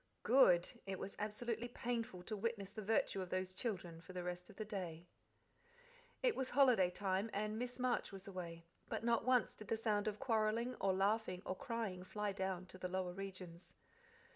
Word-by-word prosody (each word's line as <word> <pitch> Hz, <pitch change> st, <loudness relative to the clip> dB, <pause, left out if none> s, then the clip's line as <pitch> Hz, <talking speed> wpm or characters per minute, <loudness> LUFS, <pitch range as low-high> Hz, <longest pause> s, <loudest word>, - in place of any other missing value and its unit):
GOOD! 180 Hz, -10 st, +7 dB, 0.2 s
It 190 Hz, -1 st, -2 dB
was 195 Hz, +2 st, -5 dB
absolutely 225 Hz, +2 st, -2 dB
painful 235 Hz, -6 st, -3 dB
to 215 Hz, -, -3 dB
witness 205 Hz, -2 st, -2 dB
the 215 Hz, -, -5 dB
virtue 205 Hz, -2 st, +2 dB
of 185 Hz, -, -4 dB
those 185 Hz, 0 st, -1 dB
children 185 Hz, -6 st, -3 dB
for 185 Hz, -, -11 dB
the 180 Hz, -1 st, -3 dB
rest 180 Hz, 0 st, -4 dB
of -, -, -12 dB
the 215 Hz, -, -4 dB
day. 175 Hz, -5 st, -4 dB, 1.2 s
It -, -, +4 dB
was 260 Hz, -1 st, -1 dB
holiday 245 Hz, -9 st, +6 dB
time, 190 Hz, +3 st, 0 dB
and 215 Hz, +2 st, -1 dB
Miss 245 Hz, 0 st, -3 dB
Marsh 250 Hz, -3 st, +1 dB
was 195 Hz, 0 st, -8 dB
away, 170 Hz, -3 st, -6 dB, 0.2 s
but -, -, -2 dB
not 235 Hz, -1 st, +3 dB
once 250 Hz, -2 st, +4 dB
did 215 Hz, -, -11 dB
the 225 Hz, -, +1 dB
sound 215 Hz, -2 st, +1 dB
of 210 Hz, -1 st, 0 dB
quarrelling, 230 Hz, -1 st, +2 dB
or 195 Hz, -, +4 dB
laughing, 195 Hz, -1 st, +1 dB
or 185 Hz, -, -1 dB
crying 220 Hz, -5 st, -3 dB
fly 210 Hz, +2 st, -2 dB
down 190 Hz, -2 st, -2 dB
to 185 Hz, 0 st, -10 dB
the 180 Hz, -, -2 dB
lower 185 Hz, -1 st, -1 dB
regions. 185 Hz, -3 st, -7 dB
200 Hz, 190 wpm, -39 LUFS, 185-230 Hz, 1.2 s, GOOD